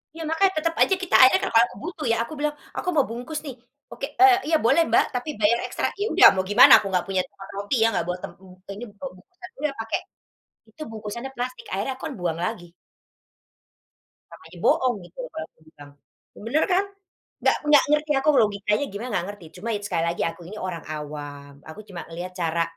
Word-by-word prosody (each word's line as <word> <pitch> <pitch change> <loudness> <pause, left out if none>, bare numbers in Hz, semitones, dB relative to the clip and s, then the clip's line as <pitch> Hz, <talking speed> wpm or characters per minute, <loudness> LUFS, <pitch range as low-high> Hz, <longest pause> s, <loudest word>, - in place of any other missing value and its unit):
Iya 330 - -6
makanya, 375 +4 +3
tetap 330 +1 -1
aja 385 - +5
kita 365 - 0
akhirnya 260 0 +7
ka - - 0
kalau 230 +1 +6
aku - - -14
butuh 325 -2 -5
ya, 230 - +2
aku 235 - -9
bilang, 295 0 -1 0.2
"Aku 360 - -2
mau 285 - +5
bungkus 245 +7 -5
nih!" 270 - -6 0.4
"Oke, 275 - -5
eee, 390 -1 +8
iya, 320 - +3
boleh 335 +8 +5
Mbak, 230 - +4
tapi 250 +5 -3
bayar 220 +3 +3
ekstra." - - -1
Ya 410 - 0
udah 375 +3 +9
mau 185 - 0
gimana, 205 +5 +7
aku 200 - -5
nggak 180 -1 0
punya 190 -1 +1
tempat 195 - -13
roti 205 +6 -2
ya, - - +5
nggak - - -1
bawa 180 0 -2
tem - - -6
mmm, 185 -1 -16 0.2
ini 215 - -8 0.2
bawa 275 - -5
bungkusan 360 - -14
iya, 300 +1 0
pakai, 225 0 -2 0.7
itu 220 - -16
bungkusannya 225 +4 -7
plastik, 250 +1 -5
akhirnya 200 +8 -2
aku - - -16
kan 285 - -7
buang 170 -2 -2
lagi. 175 -1 -6 1.6
"Sama - - -14
aja - - -14
bohong," 255 -3 +3
gitu, 175 - -17
kalau 320 0 -5
aku - - -38
bilang. 145 -2 -15 0.5
M - - -12
bener 295 +7 +2
kan? 385 +2 +2 0.6
Nggak - - +3
nggak 295 -2 +7
ngerti 300 0 +1
aku 290 +3 +1
logikanya 210 +3 0
gimana, 215 +5 -5
nggak 175 - 0
ngerti. 205 -5 -14
Cuma 230 - -5
itu, 205 0 -5
sekali 170 -4 -1
lagi 170 - -2
aku 170 - -11
ini 215 - -8
orang 170 -3 -6
awam, 145 -2 -7 0.2
aku 160 - -10
cuma 180 -3 -7
ngelihat 175 +2 -7
cara 170 -2 0
225 Hz, 215 wpm, -24 LUFS, 180-295 Hz, 1.6 s, udah